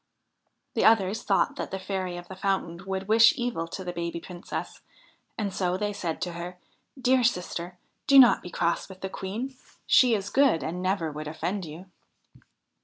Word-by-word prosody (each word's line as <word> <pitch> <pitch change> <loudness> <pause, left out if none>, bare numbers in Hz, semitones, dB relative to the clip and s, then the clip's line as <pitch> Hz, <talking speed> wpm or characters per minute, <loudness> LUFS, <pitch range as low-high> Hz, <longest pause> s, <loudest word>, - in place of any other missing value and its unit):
The - - +1
others 220 -2 +4
thought 195 - +1
that - - -4
the 190 - -3
Fairy 190 -2 -3
of 175 - -9
the 190 - -8
Fountain 185 -3 -2
would 190 0 -3
wish 225 +2 +6
evil 240 -10 -2
to 190 +3 -6
the 175 -1 -5
baby 170 0 -3
Princess, 175 +1 -7 0.7
so 180 -1 -1
they 205 +1 -2
said 175 -5 -3
to 175 - -4
her: 175 +1 -7 0.2
' - - -22
Dear 255 0 +3
sister, 180 -5 -1 0.3
do 275 - +6
not 245 -7 +8
be - - -8
cross 170 +1 -1
with 190 0 -12
the 190 - -3
Queen; 225 +9 -5 0.3
she 245 -3 +5
is 200 -1 -4
good 270 - +3
and 175 +3 -4
never 185 -4 0
would 150 +1 -6
offend 175 +5 -3
you.' 160 +4 -9
190 Hz, 180 wpm, -27 LUFS, 175-210 Hz, 0.7 s, not